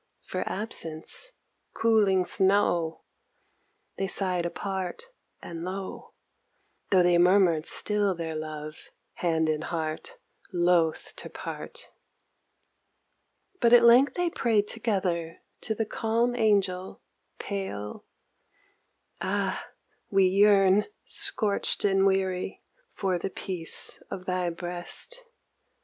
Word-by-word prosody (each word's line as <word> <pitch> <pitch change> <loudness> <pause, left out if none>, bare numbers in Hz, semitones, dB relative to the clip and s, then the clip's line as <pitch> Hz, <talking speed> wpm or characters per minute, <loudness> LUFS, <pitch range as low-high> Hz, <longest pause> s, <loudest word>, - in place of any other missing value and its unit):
For - - -4
absence! 200 - -5 0.4
cooling 210 -5 +3
snow 185 -4 +1 1.0
They 195 - 0
sighed 180 -3 -1
apart 190 - -4 0.3
and 165 -1 -6
low, 190 +1 -6 0.7
Tho' 185 -2 +5
they 175 -1 +4
murmured 175 -3 +4
still 205 -2 0
their 165 -1 -4
love, 155 -1 -7 0.3
hand 160 -2 +1
and 155 0 0
heart 160 - -4 0.3
loth 175 -3 +2
to - - -7
part. 485 +1 -8 1.7
But 235 -5 +4
at 240 -1 +8
length 245 +4 +6
they 355 -1 0
prayed 220 -7 +1
together 185 -8 -2 0.2
to 220 - -2
the 225 - -1
calm 230 +3 0
Angel 200 -5 +1 0.4
pale, 190 - -5 1.2
Ah - - -1 0.4
we 195 -1 +4
yearn, 195 +1 +5 0.2
scorched 205 -1 +1
and 195 -1 +4
weary, 190 -1 -1 0.3
for 185 -3 -1
the 195 - -3
peace 180 -3 -4
of 185 - -6
thy 180 -1 0
breast. 175 - -7
190 Hz, 100 wpm, -27 LUFS, 175-210 Hz, 1.7 s, at